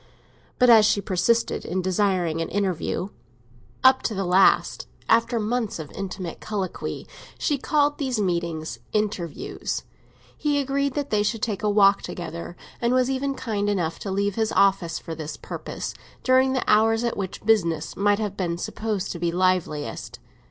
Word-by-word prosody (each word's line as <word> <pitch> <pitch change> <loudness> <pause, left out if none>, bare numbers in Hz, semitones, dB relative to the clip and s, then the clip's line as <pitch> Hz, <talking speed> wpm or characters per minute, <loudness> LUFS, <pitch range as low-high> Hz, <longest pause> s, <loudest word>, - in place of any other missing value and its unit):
But 250 -2 +6
as 220 -2 +8
she 205 - +2
persisted 200 +4 +1
in 185 +1 -2
desiring 185 -3 +1
an 165 - -3
interview—up 175 - -1
to 220 - -2
the 195 0 -1
last, 185 +2 +3 0.2
after 230 +1 +3
months 225 0 -1
of 155 -3 -8
intimate 185 -3 -5
colloquy, 200 -4 -4 0.3
she 290 -3 0
called 290 +1 +1
these 260 -5 -1
meetings 170 -4 -2
"interviews"—he 210 - -3
agreed 280 0 0
that 285 -1 -3
they 210 -1 +3
should 210 +1 -1
take 210 -4 -1
a 210 - +1
walk 200 -1 +5
together, 170 0 -6 0.3
and 240 +1 +2
was 255 +1 +2
even 270 +1 -1
kind 205 -5 -2
enough 170 -5 -1
to 200 - -5
leave 200 +1 0
his 220 +1 0
office 190 -5 +3
for 165 - -7
this 155 -2 -6
purpose, - - -6 0.3
during 260 +1 +4
the 255 - 0
hours 225 +2 +4
at 235 - -1
which 190 0 -5
business 170 -8 +1
might 205 +1 +3
have 205 -2 -3
been 170 -3 -2
supposed 210 +2 -3
to 170 - -6
be 170 0 0
liveliest. 180 -4 -1
200 Hz, 160 wpm, -24 LUFS, 175-230 Hz, 0.3 s, as